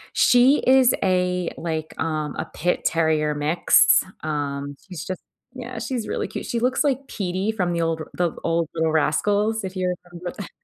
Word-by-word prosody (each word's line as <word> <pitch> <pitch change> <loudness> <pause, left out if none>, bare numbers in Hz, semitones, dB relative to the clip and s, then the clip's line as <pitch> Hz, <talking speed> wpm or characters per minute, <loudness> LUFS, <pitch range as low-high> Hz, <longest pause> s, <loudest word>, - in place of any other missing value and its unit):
She 250 +4 +5
is 260 -1 +6
a, 180 -1 +1
like, 160 -2 -4
um, 155 -2 -2
a - - -2
pit-terrier 160 -3 +1
mix. 150 +4 +4 0.2
Um, 145 -2 -3
she's 175 -3 -7
just 185 0 -5 0.3
Yeah, 250 -2 -7
she's 235 0 -3
really - - -2
cute. - - -6
She 235 - -2
looks 255 +5 +1
like 275 -1 0
Petey 190 +1 -2
from 180 -5 -1
the 170 - 0
old 165 -1 -1
the 175 -2 0
old 165 -1 0
Little 160 -1 0
Rascals, 205 +8 +1
if 190 - -6
you 185 -1 0 0.2
remember 175 0 -6
that 200 - -6
180 Hz, 170 wpm, -23 LUFS, 160-220 Hz, 0.3 s, is